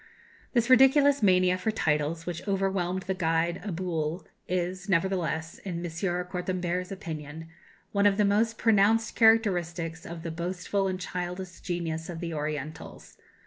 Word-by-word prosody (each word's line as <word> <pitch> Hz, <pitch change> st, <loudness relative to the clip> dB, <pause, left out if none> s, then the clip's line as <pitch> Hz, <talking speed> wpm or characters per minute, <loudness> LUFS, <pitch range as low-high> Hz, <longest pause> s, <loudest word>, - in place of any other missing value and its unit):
"This 235 Hz, -2 st, +2 dB
ridiculous 270 Hz, +2 st, +6 dB
mania 185 Hz, -2 st, +4 dB
for 200 Hz, -, -1 dB
titles 160 Hz, -4 st, 0 dB
which 175 Hz, +2 st, -5 dB
overwhelmed 190 Hz, -2 st, 0 dB
the 190 Hz, 0 st, -1 dB
guide 170 Hz, 0 st, 0 dB
Abhul" 170 Hz, -4 st, -3 dB, 0.2 s
is, 185 Hz, +2 st, -2 dB
nevertheless, 170 Hz, -3 st, 0 dB
in 180 Hz, -4 st, -5 dB
M. 170 Hz, -, -5 dB, 0.4 s
Cortambert's 180 Hz, 0 st, -3 dB
opinion, 160 Hz, -4 st, -7 dB, 0.4 s
"one 200 Hz, 0 st, +4 dB
of 200 Hz, -1 st, +2 dB
the 210 Hz, -, +4 dB
most 220 Hz, +3 st, +2 dB
pronounced 220 Hz, 0 st, +3 dB
characteristics 175 Hz, -7 st, +2 dB
of 170 Hz, -3 st, -8 dB
the 165 Hz, -, -4 dB
boastful 180 Hz, +4 st, -2 dB
and 185 Hz, -1 st, -2 dB
childish 180 Hz, 0 st, -5 dB
genius 165 Hz, -2 st, -3 dB
of 170 Hz, -2 st, -5 dB
the 165 Hz, -1 st, -4 dB
Orientals. 150 Hz, 0 st, -5 dB
180 Hz, 140 wpm, -28 LUFS, 165-195 Hz, 0.4 s, ridiculous